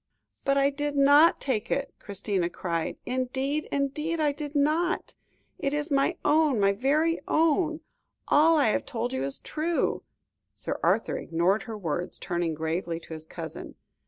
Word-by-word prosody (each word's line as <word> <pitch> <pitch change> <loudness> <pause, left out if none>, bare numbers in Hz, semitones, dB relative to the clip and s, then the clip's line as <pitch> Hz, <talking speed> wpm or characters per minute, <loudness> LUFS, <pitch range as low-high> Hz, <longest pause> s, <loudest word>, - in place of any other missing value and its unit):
"But 275 0 +2
I 275 0 +3
did 290 +1 -3
not 285 +4 +6
take 250 -6 -2
it," - - -1
Christina 195 -3 -2
cried; 170 -2 -3
"indeed, 265 +4 -1
indeed, 300 +4 -1
I 300 -2 +3
did 295 0 -7
not. 315 +5 +1 0.5
It 275 +1 -1
is 295 +1 -3
my 280 +5 +2
own, 300 -6 +3
my 200 0 +4
very 295 +10 +1
own; 320 0 +2 0.5
all 320 +2 +5
I 280 -7 +4
have - - 0
told 240 +2 -3
you 260 - -1
is 135 0 -3
true." 320 +2 -1 0.5
Sir - - -3
Arthur - - +1
ignored 175 +5 +1
her 220 - -4
words, 175 -2 -3
turning 170 -2 -2
gravely 165 +2 -2
to 165 - -10
his 160 0 -8
cousin. - - -8
275 Hz, 160 wpm, -27 LUFS, 195-300 Hz, 0.5 s, not